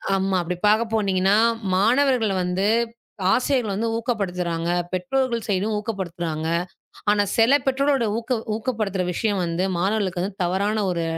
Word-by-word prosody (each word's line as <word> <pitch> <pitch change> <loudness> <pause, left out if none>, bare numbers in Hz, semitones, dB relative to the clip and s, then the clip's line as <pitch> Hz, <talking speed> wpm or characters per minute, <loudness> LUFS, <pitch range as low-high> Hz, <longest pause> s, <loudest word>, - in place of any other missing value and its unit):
ஆமா, 195 0 0
அப்படி 175 +1 -3
பாக்க 215 +2 +4
போனீங்கன்னா, 195 -2 +2 0.4
மாணவர்கள்ல 235 +1 +3
வந்து 180 +2 -1 0.7
ஆசிரியர்கள் 250 -5 +1
வந்து 225 +3 -1
ஊக்கப்படுத்துறாங்க. 180 -8 -2 0.2
பெற்றோர்கள் 240 +4 -1
சைடும் 205 +2 0
ஊக்கப்படுத்துறாங்க. 170 -7 -4 0.6
ஆனா, 205 0 +4
சில 235 +5 +5
பெற்றோரோட 270 -1 +2
ஊக்க 235 +1 -1 0.2
ஊக்கப்படுத்துற 215 -5 -2
விஷயம் 205 -1 0
வந்து 170 +2 -1 0.2
மாணவர்களுக்கு 190 -2 0 0.2
தவறான 200 +4 0
ஒரு 170 -1 -1
205 Hz, 120 wpm, -23 LUFS, 185-230 Hz, 0.7 s, சில